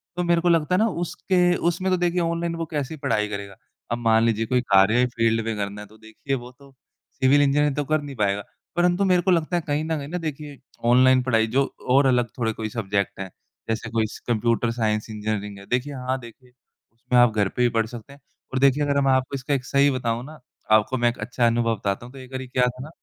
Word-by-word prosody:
तो 180 - -1
मेरे 170 -1 +2
को 175 - +2
लगता 165 +1 +2
है 185 - +2
ना 225 - +3
उसके 175 0 0
उसमें 185 +2 -1
तो 185 - +3
देखिए 175 0 0
ऑनलाइन 170 0 -1
वो 165 0 -3
कैसे 145 0 -3
ही - - -8
पढ़ाई 105 -5 +1
करेगा? 100 -1 -6 0.4
अब 120 - 0
मान 115 -1 +3
लीजिए 115 -1 +1
कोई 125 +1 +1
कार्य 100 0 +4
ही 125 - +4
फ़ील्ड 115 -1 +1
में 115 -1 -2
करना 100 0 -4
है, 105 - -10
तो 110 +1 -19
देखिए 110 +5 -5
वो 125 0 -8
तो 140 -1 -17 0.4
सिविल 135 +2 +3
इंजीनियर 145 0 +2
तो 145 - -1
कर 155 +1 +1
नहीं 140 -2 -8
पाएगा, 100 -2 0 0.3
परंतु 175 +2 +2
मेरे 180 -2 +3
को 185 - +1
लगता 170 +1 +1
है 175 - +1
कहीं 145 +1 0
न 160 0 -2
कहीं 140 - -6
ना, 175 +4 -4
देखिए 150 -3 -6 0.3
ऑनलाइन 130 +1 +5
पढ़ाई 115 -3 +2
जो 135 +5 +2 0.3
और 135 +2 +5
अलग 125 -2 +3
थोड़े 115 -2 0
कोई 110 0 -5
सब्जेक्ट 100 -4 -2
हैं, 95 -1 -5 0.4
जैसे 115 0 -2
कोई 110 -1 0
स - - -10
कंप्यूटर 115 0 +1
साइंस 110 -2 -1
इंजीनियरिंग 105 -1 -4
है, 100 - -13
देखिए 125 +5 -2
हाँ, 130 0 -2
देखिए 125 +1 -14 0.4
उसमें 120 +2 -1
आप 120 -2 +5
घर 100 -2 +2
पे 125 - -4
भी 120 - +4
पढ़ 115 -1 0
सकते 120 +3 -10
हैं। 140 - -17 0.3
और 130 - 0
देखिए 140 +2 +3
अगर 140 -1 +1
मैं 135 -1 +3
आपको 130 +1 0
इसका 135 +2 -2
एक 130 -2 -1
सही 140 +1 +3
बताऊँ 120 -2 -2
ना, 155 +2 -12 0.3
आपको 110 +4 +3
मैं 120 0 +3
एक 120 - -6
अच्छा 120 +2 0
अनुभव 115 0 +1
बताता 100 +2 -3
हूँ, 125 - -13
तो 135 - -11
एक 130 0 -12
बारी 130 0 -5
क्या 125 0 +2
था 125 +1 -5
ना 150 - -9
125 Hz, 250 wpm, -23 LUFS, 115-145 Hz, 0.4 s, ऑनलाइन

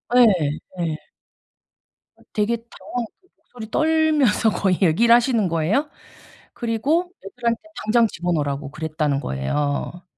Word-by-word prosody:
예. 250 - +8 0.6
예. 155 -2 -2 1.2
어 - - -26
되게 220 +2 +1
당황해서 235 +1 -6
그 370 - -30
목소리 220 -3 -11
떨면서 310 -8 +3
거의 190 -3 +1
얘기를 210 +7 +5
하시는 235 -4 +3
거예요. 175 - 0 0.6
그리고 280 +11 0
애들한테 235 +4 -2 0.2
당장 230 +1 +4
집어 175 -3 -3
넣으라고 145 -2 -2
그랬다는 155 -2 -1
거예요. 145 - -2
220 Hz, 290 characters per minute, -22 LUFS, 160-245 Hz, 1.2 s, 예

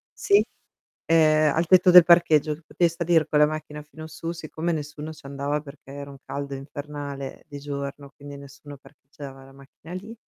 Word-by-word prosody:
sì, 405 0 +3 0.6
ehm, 155 -2 +4
al 165 - +1
tetto 185 0 +6
del 180 -1 +10
parcheggio, 160 -3 +4
che 155 - -12
potevi 170 +1 +1
salir 170 -1 +1
con 150 - +1
la 150 - +6
macchina 150 -1 -6
fino 155 +1 -11
su, 165 +1 -6
siccome 165 0 -4
nessuno 150 0 -5
ci 155 - -15
andava 140 +2 -3
perché 140 -2 -14
era 140 0 -8
un 140 - -12
caldo 140 0 -5
infernale 140 0 -7
di 145 -2 -9
giorno, 140 0 -6
quindi 145 0 -10
nessuno 140 +1 -12
parcheggiava 135 -1 -13
la 135 - -16
macchina 140 +5 -14
lì, 205 +5 -8
150 Hz, 180 wpm, -24 LUFS, 140-160 Hz, 0.6 s, del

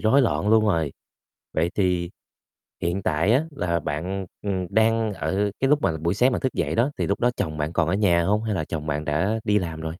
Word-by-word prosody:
rối 130 +6 +4
loạn 110 -3 0
luôn 110 0 +5
rồi. 80 -8 +1 0.6
Vậy 85 +2 +1
thì 90 -3 0 0.7
hiện 85 +3 -1
tại 85 +8 +2
á, 135 +6 +3
là 85 - -1
bạn, 90 +6 -3 0.2
ừm, 100 - -1
ừm, 95 -1 -2
đang 110 -1 +2
ở 100 +2 -1
cái 135 - +2
lúc 150 0 +3
mà - - +2
buổi 85 +3 0
sáng 125 +5 +2
thức 130 - -1
dậy - - -1
đó, 120 +5 +2
thì - - 0
lúc 100 - -1
đó 120 - +3
chồng 75 -1 -3
bạn 75 +2 -2
còn 80 - +1
ở 85 - +1
nhà 95 -4 +3
hông, 105 +4 +1
hay 110 -3 -1
là 80 - -1
chồng 75 -1 -5
bạn 75 0 -2
đã 95 +10 0
đi 105 -2 +3
làm 80 -4 -5
rồi? 80 - -5
95 Hz, 240 wpm, -24 LUFS, 85-110 Hz, 0.7 s, luôn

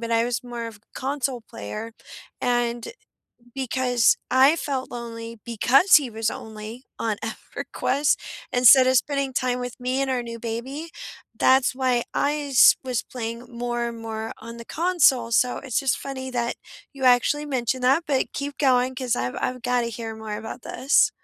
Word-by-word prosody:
but 230 0 -5
I 230 0 +3
was 245 0 -2
more 240 -2 -6
of 225 -2 -9
a - - -25 0.2
console 270 -2 -2
player. 105 - -7 0.5
And 240 -2 0 0.7
because 250 -2 +2
I 265 +4 +6
felt 275 -5 -3
lonely 230 -1 -7
because 250 - +5
he 290 -5 +1
was 225 -1 -2
only 220 +3 -8
on 220 -2 -1
EverQuest 275 +5 -1 0.4
instead 255 +1 +7
of 260 0 +4
spending 275 +1 0
time 250 -1 0
with 245 0 -6
me 255 +2 -1
and 275 - 0
our 255 -2 0
new 230 -1 -7
baby, 250 +8 -5 0.5
that's 260 -1 +4
why 255 -2 +1
I 290 +1 +1 0.2
s 255 - +7
was 250 -2 -1
playing 235 0 -6
more 240 0 -2
and 230 -1 -7
more 225 0 -5
on 230 +1 -9
the 235 - -9
console, 285 -8 +2
so 250 +2 +3
it's 260 -4 -1
just 270 -2 0
funny 260 -1 -6
that 240 -1 -1 0.4
you 275 - -10
actually 255 +4 +4
mentioned 255 -2 -1
that, 270 +7 +3
but 275 -3 0
keep 285 0 -4
going 255 -2 +3
'cause 255 -2 -1
I've 125 +1 -2
I've 250 0 -2
gotta 245 -1 +1
hear 225 0 -6
more 220 -1 -6
about 225 +3 -7
this. 270 +4 +3
245 Hz, 170 wpm, -24 LUFS, 230-265 Hz, 0.7 s, instead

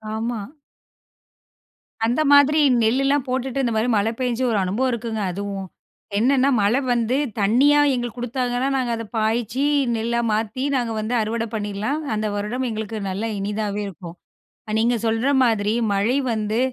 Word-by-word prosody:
ஆமா. 230 0 -3 1.6
அந்த 245 +6 +1
மாதிரி 285 +2 +6 0.2
நெல்லெல்லாம் 275 +4 +2
போட்டுட்டு 260 +1 -1
இந்த 235 -2 0
மாரி 220 +3 +1
மழை 215 +2 +1
பேஞ்சு 250 0 -1
ஒரு 220 - +1
அனுபவம் 215 +8 0
இருக்குங்க 225 -2 -3
அதுவும். 195 0 -5 0.5
என்னன்னா 265 +4 +3
மழை 215 +6 +3
வந்து 240 +2 0 0.2
தண்ணியா 265 +9 +4
எங்களுக்கு 240 -1 -4
கொடுத்தாதானே, 245 +1 -1
நாங்க 250 -2 -1
அதை 230 0 -5
பாய்ச்சி 225 +3 0 0.3
நெல்லா 235 +1 -1
மாத்தி 220 +4 -1
நாங்க 240 -3 -1
வந்து 215 +3 -3
அறுவடை 225 +1 -2
பண்ணிரலாம். 210 +7 -2 0.2
அந்த 215 - -2
வருடம் 215 +6 -2
எங்களுக்கு 220 0 -4
நல்லா 205 +4 -3
இனிதாவே 205 +1 -2
இருக்கும். 170 -1 -9 0.5
அ - - -3
நீங்க 235 +2 +2
சொல்ற 225 +4 +1 0.2
மாதிரி 215 -3 +1 0.2
மழை 215 +7 +1
வந்து, 215 +1 -1
230 Hz, 145 wpm, -22 LUFS, 215-250 Hz, 1.6 s, மாதிரி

